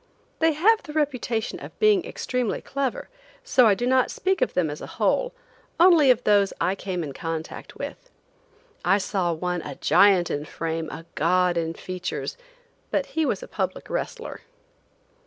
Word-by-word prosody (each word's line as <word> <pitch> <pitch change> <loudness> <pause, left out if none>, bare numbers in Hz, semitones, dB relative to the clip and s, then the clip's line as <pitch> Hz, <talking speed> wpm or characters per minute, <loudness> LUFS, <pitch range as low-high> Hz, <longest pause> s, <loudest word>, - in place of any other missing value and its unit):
They 325 0 +3
have 430 +9 +4
the 300 - -10
reputation 255 -7 -1
of - - -11
being 425 -4 +4
extremely 250 -4 -2
clever, 270 -2 -3 0.4
so 255 -4 +5
I 205 - +5
do 240 - -2
not 255 0 +3
speak 380 +1 -1
of - - 0
them 165 -4 +1
as 150 - -7
a - - -6
whole, - - +1 0.5
only 335 -5 +6
of 250 -1 +4
those 200 -2 +3
I 185 - +1
came 185 -3 -4
in 145 -3 -6
contact 165 +2 -6
with. - - -7 0.7
I 195 - +4
saw 190 -3 -1
one, 180 +1 -2
a 145 -3 -7
giant 195 0 +4
in 145 +1 -2
frame, 160 0 -4
a 165 +1 -8
god 180 +2 +2
in 165 -1 -2
features; 185 - -5 0.5
but - - 0
he 320 -2 +1
was - - -1
a - - -8
public - - -4
wrestler. 480 -1 -4
205 Hz, 170 wpm, -25 LUFS, -, 0.7 s, only